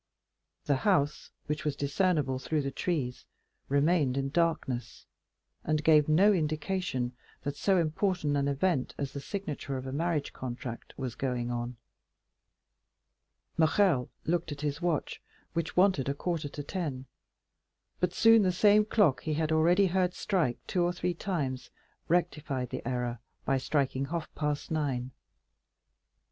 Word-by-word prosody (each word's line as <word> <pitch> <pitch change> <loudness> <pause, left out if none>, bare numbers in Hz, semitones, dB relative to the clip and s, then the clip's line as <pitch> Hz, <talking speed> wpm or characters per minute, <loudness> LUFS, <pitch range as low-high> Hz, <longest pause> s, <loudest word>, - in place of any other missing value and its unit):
The 140 -2 +2
house, 150 -2 +1 0.2
which 150 +1 -3
was 150 -2 -1
discernible 145 -2 +1
through 150 +2 -1
the 135 - -2
trees, 135 -7 -2 0.4
remained 140 -1 +2
in 135 0 0
darkness, 150 -8 -1 0.6
and 155 0 0
gave 155 -1 +5
no 195 +7 +6
indication 155 -6 -1 0.3
that 145 0 -3
so 195 +5 +2
important 165 -2 +1
an 140 0 +1
event 140 0 0
as 140 -1 -3
the 140 - -4
signature 150 -6 -4
of 130 - -6
a 130 - -4
marriage 155 0 -1
contract 120 -2 -6
was 130 -4 -3
going 125 -2 -2
on. 120 +1 -3 1.8
Morrel 160 -4 +3 0.2
looked 165 -1 0
at 145 0 -6
his 145 +2 -2
watch, 170 -4 -1 0.3
which 165 0 -3
wanted 180 -8 +4
a 140 - -1
quarter 160 -1 -2
to 145 - -6
ten; 145 -6 -4 0.9
but 180 -1 +1
soon 225 +4 +6
the 185 -2 +3
same 205 +3 +5
clock 205 - +3
he 155 -1 -2
had 160 0 0
already 170 +5 +4
heard 180 0 +1
strike 170 - 0
two 180 - 0
or 175 0 +2
three 180 0 -2
times 150 -8 -3 0.4
rectified 150 -7 0
the - - -3
error 125 -2 -2 0.3
by 135 -1 +2
striking 135 0 0
half 165 +2 -4
past 150 0 -2
nine. 135 -5 -1
150 Hz, 145 wpm, -30 LUFS, 135-175 Hz, 1.8 s, no